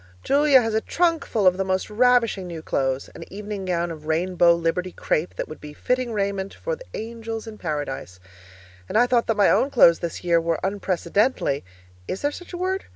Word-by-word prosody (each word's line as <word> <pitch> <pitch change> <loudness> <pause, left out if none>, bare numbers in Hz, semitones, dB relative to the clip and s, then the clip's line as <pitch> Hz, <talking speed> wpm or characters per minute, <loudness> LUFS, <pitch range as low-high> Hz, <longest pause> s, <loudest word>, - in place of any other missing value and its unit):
Julia 280 -2 +5
has 225 -1 -1
a 220 - +2
trunkful 330 - 0
of 185 0 +5
the 190 - 0
most 190 0 -1
ravishing 230 -4 +3
new 165 -2 -7
clothes 135 -2 -1
an - - -9
evening 205 0 -6
gown 175 -1 -1
of 155 -1 -9
rainbow 170 +1 +3
Liberty 170 +2 -1
crepe 165 0 -2
that - - -4
would 155 - -10
be 150 0 -9
fitting 250 +8 -1
raiment 200 -2 -2
for - - -3
the - - -13
angels 225 0 -5
in 220 -1 -10
Paradise. 145 - -4 0.7
And - - 0
I 240 - +6
thought 245 -1 +1
that 225 - 0
my 205 - +5
own 275 - +3
clothes 170 -11 +6
this 170 -2 -5
year 170 -1 +3
were 165 -1 -1
unprecedentedly 190 - 0 0.4
(is 190 - -4
there 290 - +2
such 355 +4 -10
a 355 - -5
word?) 375 +2 -2
195 Hz, 200 wpm, -23 LUFS, 170-235 Hz, 0.7 s, I